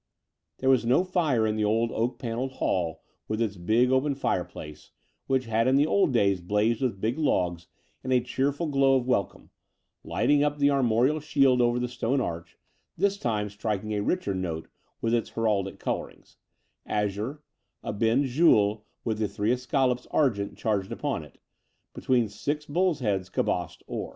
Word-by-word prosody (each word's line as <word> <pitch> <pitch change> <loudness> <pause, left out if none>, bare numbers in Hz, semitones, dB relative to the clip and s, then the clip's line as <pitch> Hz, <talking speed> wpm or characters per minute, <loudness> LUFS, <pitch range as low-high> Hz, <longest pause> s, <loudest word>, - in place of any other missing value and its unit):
There 130 - 0
was 130 -3 +3
no 125 +9 +3
fire 160 -11 +1
in 110 0 0
the 105 - 0
old 115 +2 +1
oak 120 +3 -1
panelled 125 +2 -3
hall 85 -9 -1 0.2
with 110 0 -2
its 110 -3 -1
big 110 +8 +2
open 135 +2 +2
fireplace, 85 - -4 0.4
which 130 -1 +1
had 115 +1 +1
in 130 - +4
the 145 +2 +4
old 185 0 +2
days 100 -6 +2
blazed 105 +5 +1
with 120 -7 -1
big 115 +8 -1
logs 90 - 0 0.4
and 130 - -3
a 125 - +5
cheerful 135 +6 -1
glow 135 -3 +3
of 130 -2 +1
welcome, 125 -7 -2 0.5
lighting 145 0 +2
up 150 0 0
the 145 0 +3
armorial 130 +2 +2
shield 135 -4 +3
over 120 0 +2
the 125 0 -1
stone 125 +2 -1
arch, 85 -8 -5 0.4
this 200 +2 +1
time 105 -3 -1
striking 105 0 -3
a 105 - 0
richer 105 - -1
note 85 -4 -4 0.3
with 115 0 0
its 120 -1 0
heraldic 105 -4 -1
colourings - - -5 0.3
— - - -48 0.2
azure, 110 +9 -4 0.4
a - - -3
bend 115 +6 +2
gules 110 -7 +3 0.2
with 110 -2 -2
the 110 - +1
three 105 +3 -1
escallops 125 0 0
argent 110 -9 0
charged 100 -3 -1
upon - - -2
it, - - -16 0.6
between 125 -3 +1
six 145 +9 -3
bulls' 170 0 0
heads 95 -5 -1
cabossed 90 0 -2
or. - - -5
120 Hz, 170 wpm, -27 LUFS, 105-135 Hz, 0.6 s, a